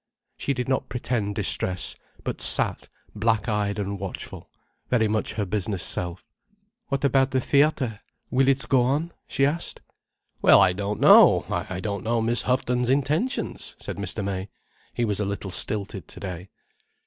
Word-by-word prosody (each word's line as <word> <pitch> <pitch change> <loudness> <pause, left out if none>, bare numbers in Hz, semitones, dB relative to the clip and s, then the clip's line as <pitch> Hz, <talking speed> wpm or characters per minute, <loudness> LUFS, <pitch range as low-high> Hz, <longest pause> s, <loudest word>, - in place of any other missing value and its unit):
She 140 - -2
did 125 0 -3
not 130 0 -1
pretend 115 -4 -2
distress, 95 -2 +1 0.3
but - - -4
sat - - +3 0.2
black 110 0 0
eyed 105 -2 -1
and 100 -1 -3
watchful, 95 -1 -7 0.4
very 115 -3 +2
much 110 0 -1
her 105 -1 -2
business 100 -1 -2
self. 90 0 -2 0.6
"What 140 -1 -2
about 135 0 +3
the 130 0 +1
theatre?—will 135 -2 0
it 135 -3 +2
go 130 -2 +4
on?" 145 +7 0 0.2
she 135 - +2
asked. 165 +5 -2 0.6
"Well - - +7
I 90 - +5
don't 100 +2 -3
know. - - +7 0.2
I 90 - -4
don't 100 0 -4
know 115 +1 0
Miss 115 +2 +2
Houghton's 125 -1 0
intentions," 150 - -1
said - - -7
Mr. 100 +1 -3
May. 95 0 -3 0.5
He 120 - +1
was 105 -2 -1
a - - +1
little 100 -1 -4
stilted 100 -3 -2
today. 90 -1 -7
110 Hz, 155 wpm, -25 LUFS, 100-130 Hz, 0.6 s, Well